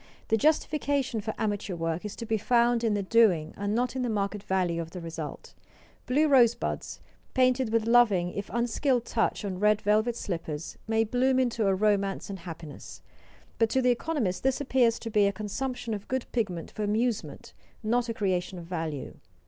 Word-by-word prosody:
The 225 - +4
justification 285 -2 +1
for 220 +1 -4
amateur 205 -3 -2
work 165 0 -2
is 210 - -5
to 230 - -6
be 220 -1 0
found 235 +1 +3
in 220 -2 +2
the 200 - -1
doing 190 -7 +3
and 205 +1 -2
not 245 +2 0
in 260 - -1
the 245 - -1
market 205 -1 -1
value 180 -3 0
of 165 - -7
the 180 - -7
result. 165 -2 -7 0.5
Blue 295 +5 +3
rosebuds, 245 -5 +2 0.4
painted 255 -2 +3
with 225 -1 +2
loving 215 -7 +4
if 200 0 -5
unskilled 240 +1 +1
touch 225 -2 0
on 185 -2 -4
red 210 +1 +4
velvet 215 +3 +2
slippers, 165 -7 -5
may 225 0 +2
bloom 255 +4 +2
into 235 -4 +1
a 195 - +3
romance 200 -1 0
and 195 - -6
happiness; 165 -3 -9 0.6
but 225 -1 +3
to 265 - +1
the 250 -1 +4
economist 245 - -1
this 265 0 +1
appears 255 -4 +2
to 225 - -6
be 210 -1 +4
a - - +2
consumption 230 +4 -4
of 205 -1 -6
good 260 -1 -2
pigment 190 -8 -2
for 215 - -6
amusement, 215 - -1 0.3
not 240 +2 +1
a - - -1
creation 185 -2 -1
of 170 - -8
value. 160 -5 -4
215 Hz, 185 wpm, -28 LUFS, 190-245 Hz, 0.6 s, The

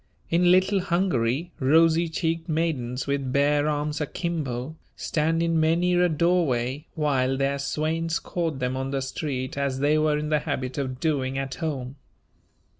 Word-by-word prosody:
In 175 +1 +4
Little 185 +2 +4
Hungary 170 -4 0
rosy 165 +4 +4
cheeked 165 +1 -2
maidens 145 -6 -1
with 140 -2 -1
bare 145 +2 +2
arms 150 +1 -2
akimbo, 150 -4 -3 0.2
stand 165 +2 0
in 165 -1 +1
many 170 +3 +2
a 180 0 +3
doorway 150 -5 +1
while 135 -4 +1
their 140 +1 0
swains 160 +3 -1
court 165 -5 -3
them 125 0 -2
on 135 0 -3
the 135 -1 -1
street 135 -1 -4
as 140 -2 -1
they 145 +3 +2
were 155 -1 +2
in 150 0 -3
the 150 -1 +3
habit 140 -3 -3
of 130 -2 -3
doing 135 -4 0
at 135 -1 -3
home. 140 -5 -4
150 Hz, 155 wpm, -25 LUFS, 135-165 Hz, 0.2 s, In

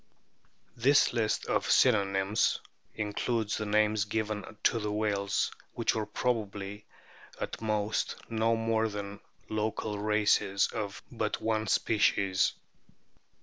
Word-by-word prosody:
^ - - -42 0.7
This 135 +4 +4
list 115 -3 0
of - - 0
synonyms 100 -4 +3 0.4
includes 110 +1 -1
the 110 - -3
names 105 0 +2
given 110 0 -3
to 105 -3 +1
whales 105 -2 0 0.2
which 115 - 0
are 110 -1 -2
probably 105 -3 -2 0.5
at - - -5
most 105 -1 -1
no 115 0 +1
more 115 0 +1
than 100 -1 -6 0.3
local 110 -1 -2
races 105 -2 +2
of 105 -3 -4
but - - -2
one 110 -1 0
species. 100 -3 +2
105 Hz, 110 wpm, -30 LUFS, 105-110 Hz, 0.7 s, This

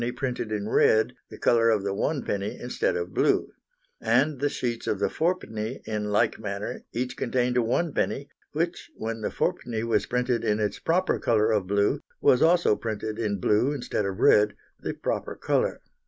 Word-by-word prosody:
printed 125 -3 -3
in 105 -1 -2
red, 110 0 +3 0.2
the - - -10
colour 115 -1 +3
of 110 -3 +2
the 100 -1 -1
1d., 105 -4 -2
instead 125 - -1
of 90 +1 -3
blue. - - +2 0.5
And 130 +5 +2
the 145 +1 +1
sheets 120 -4 -3
of - - +1
the - - 0
4d., 130 -10 -2
in 105 -1 -2
like 110 +2 +2
manner, 100 -1 -4
each 125 +1 -3
contained 125 0 0
a - - +4
1d, 140 +2 0 0.2
which, 170 +3 -2
when 115 0 -4
the - - -1
4d. 115 -2 -2
was 115 -1 +1
printed 125 -1 0
in 105 -1 +1
its 105 -1 -1
proper 180 +3 +1
colour 110 -1 +2
of 105 -4 +1
blue, 100 +1 +1 0.2
was 125 - +4
also 170 -8 +4
printed 110 0 -4
in 105 -3 0
blue 110 +9 +2
instead 120 -6 -2
of 95 -1 -4
red, 105 0 +5 0.2
the - - -4
proper - - -3
colour. - - 0
115 Hz, 175 wpm, -26 LUFS, 105-125 Hz, 0.5 s, red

